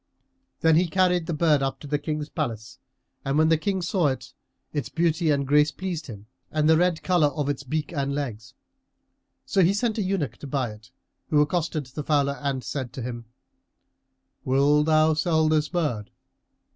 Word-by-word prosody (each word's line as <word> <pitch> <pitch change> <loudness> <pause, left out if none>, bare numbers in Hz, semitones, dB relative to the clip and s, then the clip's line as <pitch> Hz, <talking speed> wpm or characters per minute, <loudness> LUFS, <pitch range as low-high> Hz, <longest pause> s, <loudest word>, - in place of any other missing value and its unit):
Then 160 -1 +5
he 180 +1 +3
carried 180 -1 +2
the 170 - -1
bird 150 -2 +3
up 135 0 -2
to - - -9
the 145 0 -1
King's 150 0 -3
palace 115 -8 -4 0.4
and 135 +2 0
when 155 +1 +4
the 165 - +5
King 190 +1 -1
saw 175 -2 +1
it, 130 -2 -4 0.4
its 145 -5 -2
beauty 165 0 +1
and 140 -2 +2
grace 150 +2 +4
pleased 170 0 -5
him 105 -4 -9 0.2
and 155 -1 +1
the 160 - +6
red 175 0 +1
colour 175 -5 +3
of 145 -1 -2
its 145 - -2
beak 150 +4 -3
and 140 -2 -1
legs. 125 -3 -5 0.9
So 195 - +2
he 185 +3 +4
sent 225 0 0
an 205 - 0
eunuch 185 -7 -2
to 145 - -9
buy 130 -4 -1
it, 105 +2 -14 0.4
who 150 - +3
accosted 155 0 0
the 130 +4 -7
fowler 140 -1 +1
and 135 -3 -2
said 130 -4 -4
to 130 - -6
him, 120 -1 -6 1.2
"Wilt 145 +3 +3
thou 155 0 +4
sell 160 0 +2
this 155 -1 +2
bird?" 145 - -2
150 Hz, 185 wpm, -25 LUFS, 135-165 Hz, 1.2 s, the